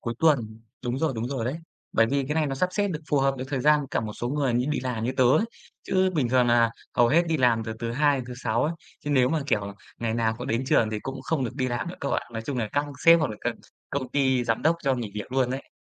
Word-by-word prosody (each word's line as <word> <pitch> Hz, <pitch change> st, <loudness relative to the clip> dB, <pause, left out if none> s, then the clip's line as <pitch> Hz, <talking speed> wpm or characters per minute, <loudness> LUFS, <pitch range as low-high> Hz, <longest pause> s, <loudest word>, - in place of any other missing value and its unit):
Cuối 115 Hz, 0 st, -3 dB
tuần. 115 Hz, -9 st, +2 dB, 0.2 s
Đúng 125 Hz, +2 st, -1 dB
rồi, 160 Hz, -3 st, +1 dB
đúng 115 Hz, +2 st, -2 dB
rồi 130 Hz, -5 st, -2 dB
đấy. 130 Hz, +6 st, -2 dB, 0.4 s
Bởi 115 Hz, -, +4 dB
vì 140 Hz, +2 st, 0 dB
cái 150 Hz, -, -1 dB
này 160 Hz, -2 st, +2 dB
nó 135 Hz, -, -2 dB
sắp 180 Hz, +7 st, +1 dB
xếp 205 Hz, +1 st, +1 dB
được 160 Hz, -5 st, -4 dB
phù 145 Hz, -, +3 dB
hợp 135 Hz, 0 st, +2 dB
với 130 Hz, -, -4 dB
thời 135 Hz, -2 st, -1 dB
gian 150 Hz, 0 st, +4 dB
cả -, -, 0 dB
một 110 Hz, -1 st, -5 dB
số 120 Hz, +3 st, -4 dB
người 140 Hz, -3 st, 0 dB
như 125 Hz, +2 st, +1 dB
đi -, -, 0 dB
làm, 125 Hz, -3 st, -3 dB
như 125 Hz, -, 0 dB
tớ 130 Hz, -, +4 dB
ấy. 130 Hz, -, +4 dB, 0.4 s
Chứ 185 Hz, 0 st, +2 dB
bình 135 Hz, -7 st, +1 dB
thường 125 Hz, -1 st, +3 dB
nà 120 Hz, -1 st, +4 dB, 0.2 s
hầu 120 Hz, -1 st, +4 dB
hết 160 Hz, +7 st, +4 dB
đi 165 Hz, -1 st, +1 dB
làm 120 Hz, -5 st, +3 dB
từ 110 Hz, -, -4 dB
thứ 115 Hz, 0 st, -3 dB
2 145 Hz, +1 st, +3 dB
đến 125 Hz, -, -4 dB
thứ 125 Hz, -, -7 dB
6 120 Hz, -2 st, 0 dB
ấy, 155 Hz, -, 0 dB, 0.3 s
chứ 145 Hz, -, -4 dB
nếu 130 Hz, -3 st, +4 dB
mà, 160 Hz, -1 st, 0 dB
kiểu, 100 Hz, -7 st, -1 dB, 0.2 s
ngày 115 Hz, -1 st, -1 dB
nào 115 Hz, -1 st, +1 dB
cũng -, -, -5 dB
đến 115 Hz, +4 st, 0 dB
trường 110 Hz, -4 st, +3 dB
thì 105 Hz, -1 st, -3 dB
cũng 135 Hz, +2 st, -6 dB
không 150 Hz, -2 st, -1 dB
được 125 Hz, -, -4 dB
đi 130 Hz, -1 st, -1 dB
làm 120 Hz, +8 st, -2 dB
nữa, 180 Hz, -, -6 dB
cậu 140 Hz, -, -2 dB
ạ. -, -, 0 dB
Nói 115 Hz, 0 st, -4 dB
chung 130 Hz, +2 st, -3 dB
là 110 Hz, -3 st, -1 dB
các 145 Hz, +1 st, +1 dB, 0.2 s
sếp 165 Hz, 0 st, +8 dB
hoặc 145 Hz, -, 0 dB
là 105 Hz, -, -6 dB
các -, -, -1 dB, 0.4 s
công 135 Hz, -3 st, -2 dB
ty, 130 Hz, -3 st, +2 dB
giám 115 Hz, -1 st, 0 dB
đốc 165 Hz, +2 st, +3 dB
cho 135 Hz, -2 st, +2 dB
nghỉ 115 Hz, -5 st, -4 dB
việc 105 Hz, +4 st, -6 dB
luôn 130 Hz, -2 st, +2 dB
ấy. 135 Hz, +1 st, -5 dB
130 Hz, 305 wpm, -26 LUFS, 115-145 Hz, 0.4 s, sếp